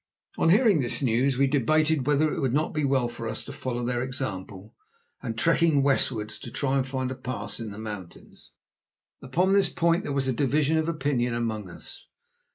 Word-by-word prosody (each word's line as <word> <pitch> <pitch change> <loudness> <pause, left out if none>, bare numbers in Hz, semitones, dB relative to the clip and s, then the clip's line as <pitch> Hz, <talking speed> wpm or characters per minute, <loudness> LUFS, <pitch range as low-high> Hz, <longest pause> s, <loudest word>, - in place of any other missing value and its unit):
On - - +3
hearing 205 -2 +5
this 125 +3 +1
news 125 +2 +2
we 140 - +4
debated 150 +1 +2
whether 150 +1 +2
it - - -3
would 130 -2 0
not 155 +2 0
be 150 - -1
well 135 -3 +2
for 120 -1 -6
us - - -4
to - - -9
follow 120 -1 -4
their 120 0 -1
example 105 -6 -5 0.5
and, 115 -1 -5
trekking 165 0 +3
westwards, 115 -6 0
try 135 -1 -1
to 135 - +2
find 130 -1 -3
a - - -4
pass 130 -1 -5
in 115 -2 -5
the 100 - -9
mountains. 105 -5 -9 0.7
Upon 180 +9 +1
this 200 -2 +4
point 170 +2 +1
there - - -4
was 135 -1 0
a 130 - +1
division 145 +4 +1
of 160 +1 -1
opinion 135 -6 0
among 110 -4 -3
us. 85 - -11
130 Hz, 190 wpm, -26 LUFS, 120-150 Hz, 0.7 s, hearing